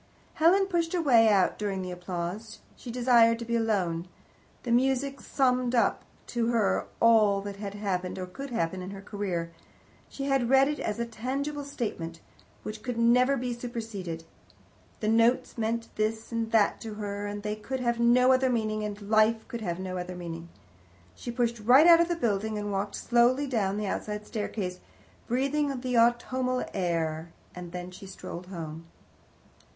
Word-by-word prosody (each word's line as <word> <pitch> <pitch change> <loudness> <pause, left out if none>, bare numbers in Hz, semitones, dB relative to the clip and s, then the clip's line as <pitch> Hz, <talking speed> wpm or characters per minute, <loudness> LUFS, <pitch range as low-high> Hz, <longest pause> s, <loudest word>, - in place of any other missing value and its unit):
Helen 365 +5 +4
pushed 345 -3 -1
her 355 - +1
way 230 -6 +6
out 195 -3 +3
during 195 -3 -2
the 180 - -5
applause. 180 +5 -5 0.2
She 250 - -10
desired 235 -1 +4
to 235 - -6
be 235 0 -1
alone. 185 -7 0 0.6
The 240 - -3
music 265 +2 +1
summed 255 -2 +1
up 230 -4 +2 0.2
to 235 -1 -1
her 220 -5 +1
all 215 -3 +5
that 200 0 -7
had 200 -1 -6
happened 185 -3 -2
or 185 - -3
could 270 +10 -8
happen 185 -5 -2
in 180 - -6
her 195 0 -8
career. 185 -5 -3 0.6
She 275 0 -5
read 270 0 +4
it 295 0 -2
as 210 - -2
a 235 - -1
tangible 275 +6 -3
statement, 195 -12 -5 0.4
which 215 0 -6
could 245 0 -4
never 250 +4 +4
be 245 -1 -2
superseded. 220 -9 -6 0.8
The 215 - -1
notes 230 +3 +3
meant 230 0 -2
this 220 +2 -1
and 230 -1 -2
that 215 -3 +3
to 220 -2 -6
her, 205 -1 -4
and 205 0 -5
they 210 0 -2
could 260 +5 -5
have 235 -1 0
no 250 +2 +5
other 260 0 +3
meaning, 215 -3 -1
and 205 -1 -4
life 220 +1 +3
could 235 -3 -6
have 175 -5 -2
no 185 -1 -4
other 180 0 -5
meaning. 170 -1 -7 0.6
She - - -8
pushed 235 -1 -1
right 250 +8 +6
out 340 -1 +8
of 340 - +2
the 345 - 0
building, 220 -6 -1
and 205 0 -3
walked 200 +1 -2
slowly 245 +4 +3
down 210 -7 0
the 210 - -2
outside 210 +1 -3
staircase, 200 -4 -4 0.5
breathing 275 +2 0
the 250 -1 -2
autumnal 250 +2 +2
air, 165 -3 -1 0.2
and 180 -1 -8
then 180 0 -6
she 195 +2 -11
strolled 180 -1 -8
home. 165 -3 -7
225 Hz, 175 wpm, -28 LUFS, 195-250 Hz, 0.8 s, out